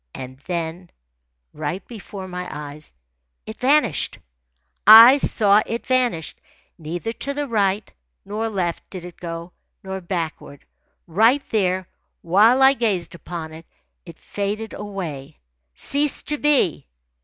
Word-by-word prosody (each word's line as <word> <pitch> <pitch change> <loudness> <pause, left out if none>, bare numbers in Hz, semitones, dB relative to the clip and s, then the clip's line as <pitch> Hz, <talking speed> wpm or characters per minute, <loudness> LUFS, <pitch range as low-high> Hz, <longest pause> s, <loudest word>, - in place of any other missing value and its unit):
And 130 0 -8
then, 170 0 -4 0.6
right 155 +5 -5
before 200 -4 -9
my 180 0 -6
eyes, 150 +1 -8 0.5
it 220 - -9
vanished. 260 - +2 0.7
I 230 +5 +11
saw 210 -6 +3
it 230 +1 -4
vanish. 245 -11 0 0.4
Neither 175 +8 -4
to 280 +4 -4
the 290 0 -2
right 205 -3 0 0.3
nor 220 +2 -3
left 180 -5 -3
did 185 -3 -7
it 175 -1 -11
go, 170 0 -7 0.3
nor 190 0 -5
backward. 165 -5 -5 0.4
Right 225 - +3
there, 185 -4 0 0.4
while 215 +10 +4
I 265 +1 +7
gazed 210 -9 -1
upon 170 -2 -7
it, 160 +1 -12 0.4
it 170 -3 -13
faded 205 +2 -4
away, 165 -9 -7 0.4
ceased 285 - -1
to 295 -1 -1
be. 270 - +2
190 Hz, 125 wpm, -22 LUFS, 170-225 Hz, 0.7 s, I